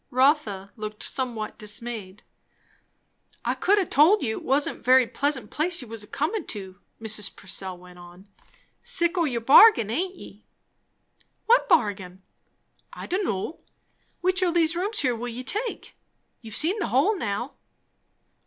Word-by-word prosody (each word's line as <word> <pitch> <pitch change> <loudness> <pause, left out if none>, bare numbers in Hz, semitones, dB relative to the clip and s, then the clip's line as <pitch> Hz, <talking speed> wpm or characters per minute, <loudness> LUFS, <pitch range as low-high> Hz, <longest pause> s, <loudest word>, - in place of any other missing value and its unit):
Rotha 255 -8 +1
looked 215 0 -6
somewhat 235 -6 -3
dismayed. 210 -2 -5 1.2
"I - - +1
could 405 +2 +2
ha' 385 -4 +1
told 330 +10 +4
you, 220 -3 -2
it - - -14
wasn't 280 +2 0
a - - -23
very 255 +1 +5
pleasant 265 -2 -2
place 335 +3 0
you - - -12
was 225 -1 -7
a - - -13
comin' 320 +10 -2
to," 190 -3 -7 0.2
Mrs. 220 -1 +1
Purcell 190 -1 -6
went 180 0 -15
on. 175 +3 -15 0.5
"Sick 370 -8 +1
o' 345 -2 +2
your 240 -5 -2
bargain, 235 - +7
aint 365 +9 -2
ye?" 210 - -13 1.0
"What 475 +2 +3
bargain?" 195 - +1 0.7
"I - - -8
don' 375 +3 -1
know! 205 - -3 0.6
Which 370 +1 +1
o' 365 - +3
these 335 -1 +2
here 345 - -2
rooms 420 -1 -1
will 245 -2 -1
you 245 +1 -6
take? 425 - -4 0.5
You've 220 -3 -8
seen 365 +8 +1
the - - -1
whole 275 - +2
now." 235 - -3
250 Hz, 155 wpm, -25 LUFS, 210-345 Hz, 1.2 s, bargain